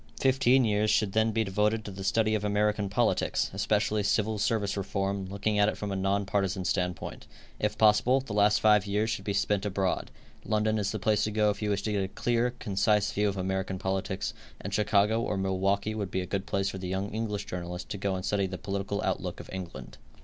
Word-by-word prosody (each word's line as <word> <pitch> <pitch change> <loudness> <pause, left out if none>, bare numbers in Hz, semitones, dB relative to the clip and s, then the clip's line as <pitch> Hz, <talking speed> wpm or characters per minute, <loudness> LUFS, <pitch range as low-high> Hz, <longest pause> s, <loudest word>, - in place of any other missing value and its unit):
Fifteen 130 -1 +4
years 105 0 +2
should 105 -2 +2
then 110 +2 +2
be 110 +1 +1
devoted 105 +2 0
to 105 - -6
the 95 0 -7
study 110 +2 +2
of 105 -1 0
American 105 0 +1
politics, 115 +4 +1
especially 105 +1 +1
civil 105 +1 +1
service 105 -2 0
reform, 100 0 -2
looking 100 +2 -1
at 105 +1 +5
it - - -5
from 105 -1 -4
a - - -2
non 100 +1 0
partisan 95 -1 -1
standpoint. 90 -3 -2 0.3
If - - -1
possible, 110 +5 +4
the 130 -6 -7
last 105 0 +4
five 105 -2 +4
years 105 +3 0
should 100 -3 -4
be 100 - -1
spent 100 -1 +1
abroad. 95 -2 -1 0.3
London 110 0 +1
is 100 -1 -1
the 110 - -2
place 105 +1 +1
to 105 - -2
go 105 0 +3
if 105 - -7
you 105 - -1
wish 100 0 0
to 110 - -1
get 100 -2 0
a - - -2
clear, 120 +4 0
concise 105 0 +1
view 105 0 +1
of 100 - -4
American 95 0 -2
politics, 95 0 -2 0.3
and - - -6
Chicago 105 +1 +3
or 105 - -1
Milwaukee 95 +2 0
would 105 -3 -3
be 95 - -1
a - - -4
good 95 +1 -3
place 100 0 0
for 95 - -6
the 90 - -5
young 95 +2 -2
English 105 -2 -3
journalist 90 0 -5
to 100 - -4
go 100 -1 -1
and 95 - -4
study 100 -2 +1
the 95 0 -5
political 100 0 -3
outlook - - -2
of - - -10
England. 65 -9 -7
100 Hz, 220 wpm, -29 LUFS, 95-105 Hz, 0.3 s, at